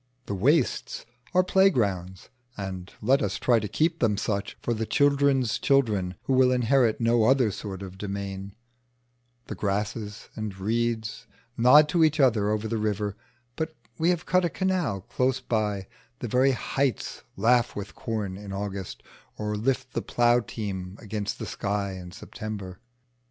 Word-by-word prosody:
The -, -, -4 dB
wastes 95 Hz, -, +1 dB, 0.3 s
are 185 Hz, 0 st, +4 dB
playgrounds 100 Hz, -, +1 dB, 0.3 s
(and 95 Hz, -2 st, -5 dB
let 135 Hz, +6 st, +4 dB
us -, -, -1 dB
try 120 Hz, -2 st, +3 dB
to 105 Hz, -, -3 dB
keep 160 Hz, -, 0 dB
them 105 Hz, -4 st, +2 dB
such 100 Hz, -1 st, -2 dB
for 120 Hz, -, -1 dB
the 110 Hz, -1 st, -2 dB
children's 140 Hz, -4 st, +3 dB
children 105 Hz, -10 st, +2 dB
who 135 Hz, -, 0 dB
will 130 Hz, 0 st, +5 dB
inherit 125 Hz, -2 st, +3 dB
no 115 Hz, -1 st, +3 dB
other 125 Hz, -3 st, +4 dB
sort 95 Hz, 0 st, -6 dB
of 95 Hz, 0 st, -9 dB
demesne); 100 Hz, -1 st, -5 dB, 0.9 s
the -, -, -6 dB
grasses 105 Hz, +1 st, -3 dB
and 105 Hz, -3 st, -5 dB
reeds 110 Hz, +2 st, -1 dB, 0.3 s
nod 130 Hz, +6 st, +7 dB
to 170 Hz, 0 st, +3 dB
each 155 Hz, -1 st, +3 dB
other 115 Hz, -7 st, +4 dB
over 110 Hz, +1 st, -1 dB
the 115 Hz, 0 st, -1 dB
river, 105 Hz, -1 st, -1 dB, 0.4 s
but 160 Hz, 0 st, -3 dB, 0.2 s
we 165 Hz, +2 st, +3 dB
have 175 Hz, -1 st, 0 dB
cut 185 Hz, 0 st, +3 dB
a 175 Hz, -, +1 dB
canal 175 Hz, -, -1 dB
close 130 Hz, +6 st, 0 dB
by; 105 Hz, -5 st, -1 dB, 0.3 s
the 120 Hz, -, -5 dB
very 130 Hz, +4 st, +3 dB
heights 135 Hz, +1 st, -2 dB, 0.2 s
laugh 120 Hz, +4 st, +3 dB
with 100 Hz, -1 st, -6 dB
corn 105 Hz, -6 st, -3 dB
in 100 Hz, -1 st, -8 dB
August 100 Hz, -1 st, -5 dB, 0.3 s
or 105 Hz, 0 st, -2 dB
lift 130 Hz, +4 st, -1 dB
the -, -, -1 dB
plough 120 Hz, 0 st, +3 dB
team 100 Hz, -4 st, -5 dB
against 105 Hz, -2 st, -4 dB
the -, -, -5 dB
sky 100 Hz, -1 st, -2 dB
in 90 Hz, -2 st, -8 dB
September. 100 Hz, -3 st, -7 dB
110 Hz, 155 wpm, -26 LUFS, 100-130 Hz, 0.9 s, nod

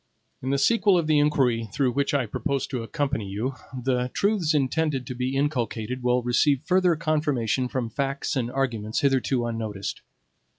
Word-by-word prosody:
In 130 Hz, -, -3 dB
the 140 Hz, -, +2 dB
sequel 200 Hz, +5 st, +4 dB
of 170 Hz, -, +1 dB
the 155 Hz, -1 st, +3 dB
inquiry 125 Hz, -7 st, +2 dB
through 130 Hz, +2 st, +1 dB
which 140 Hz, +3 st, 0 dB
I 135 Hz, -3 st, +2 dB
propose 140 Hz, +5 st, -2 dB
to 125 Hz, -4 st, -4 dB
accompany 135 Hz, -3 st, -2 dB
you, 110 Hz, +8 st, -3 dB, 0.2 s
the 125 Hz, -1 st, -1 dB
truths 195 Hz, -7 st, +2 dB
intended 145 Hz, -1 st, 0 dB
to 125 Hz, -, -5 dB
be 125 Hz, +2 st, -2 dB
inculcated 125 Hz, -4 st, -1 dB
will 125 Hz, 0 st, +2 dB
receive 130 Hz, +3 st, +2 dB
further 180 Hz, 0 st, +3 dB
confirmation 145 Hz, -6 st, 0 dB
from 125 Hz, -1 st, -2 dB
facts 140 Hz, +3 st, -2 dB
and 120 Hz, -3 st, -1 dB
arguments 115 Hz, -5 st, -1 dB
hitherto 130 Hz, -3 st, +1 dB
unnoticed. 110 Hz, -4 st, -4 dB
130 Hz, 165 wpm, -25 LUFS, 120-145 Hz, 0.2 s, sequel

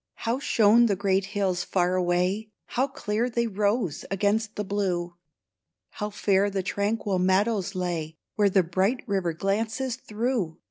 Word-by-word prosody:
How 235 Hz, +3 st, -2 dB
shone 235 Hz, -3 st, +4 dB
the 200 Hz, -, +1 dB
great 195 Hz, 0 st, +1 dB
hills 190 Hz, -3 st, -1 dB
far 180 Hz, -1 st, +1 dB
away; 185 Hz, +4 st, 0 dB, 0.2 s
How 260 Hz, +3 st, 0 dB
clear 230 Hz, -2 st, -2 dB
they 235 Hz, 0 st, 0 dB
rose 205 Hz, -5 st, 0 dB
against 205 Hz, +3 st, 0 dB
the 210 Hz, -, -2 dB
blue; 185 Hz, -4 st, -1 dB, 0.8 s
How 210 Hz, -1 st, -4 dB
fair 200 Hz, -1 st, +2 dB
the 195 Hz, -1 st, -2 dB
tranquil 200 Hz, 0 st, -1 dB
meadows 195 Hz, +1 st, +1 dB
lay, 165 Hz, -3 st, -3 dB, 0.2 s
Where 205 Hz, -1 st, +3 dB
the 190 Hz, -1 st, +3 dB
bright 190 Hz, +9 st, 0 dB
river 190 Hz, -6 st, -1 dB
glances 225 Hz, +8 st, -1 dB
through 220 Hz, -7 st, -2 dB
200 Hz, 145 wpm, -26 LUFS, 185-220 Hz, 0.8 s, shone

